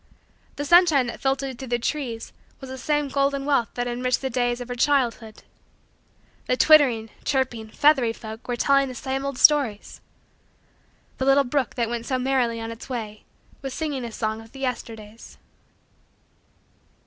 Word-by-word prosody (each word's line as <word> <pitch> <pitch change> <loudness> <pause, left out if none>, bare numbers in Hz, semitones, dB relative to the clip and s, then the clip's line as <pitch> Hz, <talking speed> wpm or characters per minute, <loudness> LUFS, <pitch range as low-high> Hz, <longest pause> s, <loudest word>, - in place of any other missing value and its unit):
The 290 - -4
sunshine 335 -5 +5
that 240 - -7
filtered 270 -1 -1
through 265 - -7
the 240 0 0
trees 240 -3 -4 0.3
was 265 -1 -9
the 260 - -6
same 295 +2 0
golden 275 0 0
wealth 275 -5 +1
that 245 0 -2
enriched 250 +1 -1
the 265 - -2
days 245 0 0
of 245 - -7
her 245 - -4
childhood. 240 -4 0 1.0
The 250 - +1
twittering, 255 -9 +5
chirping, 245 -5 -1
feathery, 275 -3 +3
folk 220 0 -10
were 245 - -1
telling 275 +2 +3
the 255 - -7
same 265 +2 -3
old 275 -2 -4
stories. 265 -10 +3 1.2
The 260 - 0
little 275 +1 +5
brook 270 0 -1
that 235 -2 0
went 235 0 -4
so 260 - 0
merrily 250 -3 0
on 225 0 -5
its 230 +3 -10
way 215 -4 -6 0.4
was 270 -2 -5
singing 290 -5 -3
a 235 - -5
song 220 0 -3
of 225 0 -16
the 270 - -10
Yesterdays. 225 -4 -6
255 Hz, 165 wpm, -24 LUFS, 230-275 Hz, 1.2 s, sunshine